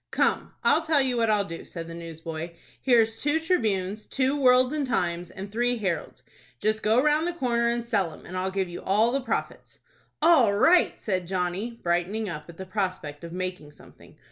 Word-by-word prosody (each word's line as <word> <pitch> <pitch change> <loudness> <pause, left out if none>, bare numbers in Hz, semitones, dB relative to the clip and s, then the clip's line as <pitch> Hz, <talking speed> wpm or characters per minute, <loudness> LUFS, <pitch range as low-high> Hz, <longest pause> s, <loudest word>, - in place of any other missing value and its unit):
"Come, - - 0
I'll - - +4
tell 320 -2 +2
you 260 -2 +1
what 230 -1 +2
I'll 210 -2 +2
do," 165 -3 -7
said 165 -2 -7
the 165 - -8
newsboy. 165 0 -7 0.3
"Here's 225 -3 +3
two 295 +2 +2
'Tribunes,' 215 - -1
two 270 +1 0
'Worlds' 255 -1 +4
and 295 -3 -1
'Times' 175 -7 -1
and 195 +2 -8
three 240 +2 +1
'Heralds.' 190 -6 -3 0.4
Just 215 +1 0
go 220 +3 +3
round 300 +4 +2
the 350 - -2
corner, 240 -7 0
and 235 0 -1
sell 200 -7 0
'em, - - -14
and 185 - -8
I'll 185 +1 -1
give 190 -1 -1
you 175 0 -8
all 215 +5 +2
the 275 +2 0
profits." 255 - -4 0.4
"All 300 -11 +5
right!" 345 - +4
said 185 -4 -2
Johnny, 190 +5 -2
brightening 175 +5 0
up 155 -3 -7
at 170 - -12
the 190 - -6
prospect 185 -6 -3
of 170 - -7
making 180 -4 -5
something. - - -18
210 Hz, 195 wpm, -26 LUFS, 180-250 Hz, 0.4 s, All